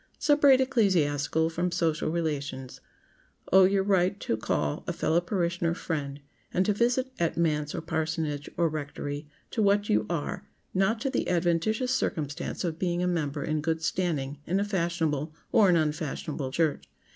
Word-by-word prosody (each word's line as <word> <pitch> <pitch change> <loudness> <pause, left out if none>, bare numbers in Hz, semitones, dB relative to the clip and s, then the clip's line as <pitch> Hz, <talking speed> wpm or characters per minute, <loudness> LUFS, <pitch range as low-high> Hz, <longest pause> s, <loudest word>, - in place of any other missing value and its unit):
Separate 290 -3 +5
ecclesiastical 160 - +2
from 175 +2 -1
social 165 -3 0
relations. 145 -5 -3 0.7
Owe 190 0 +8
your 195 +1 +2
right 190 0 +2
to - - 0
call 75 -9 -1
a - - -1
fellow 170 +2 +1
parishioner 170 -2 -1
"friend," 145 -5 -4 0.3
and 185 - +1
to 210 - +2
visit 245 +4 +1
at 170 -1 0
manse 150 -3 0
or - - -3
parsonage, 160 -3 -2
or 170 - +3
rectory, 145 -1 -5 0.2
to 225 - -1
what 205 0 +3
you 105 0 +2
are—not 190 - -2
to 270 - -1
the 255 - -1
adventitious 180 +8 +1
circumstance 155 - -2
of 165 -2 -3
being 175 -1 0
a - - +1
member 150 -5 -1
in 155 0 -1
good 160 +1 -1
standing 150 -6 -1
in 185 +4 +1
a 200 - +1
fashionable, 170 -6 -1 0.2
or 210 -4 +5
an 175 - +5
unfashionable, 155 -3 -2
church. 150 - 0
165 Hz, 155 wpm, -28 LUFS, 150-190 Hz, 0.7 s, Owe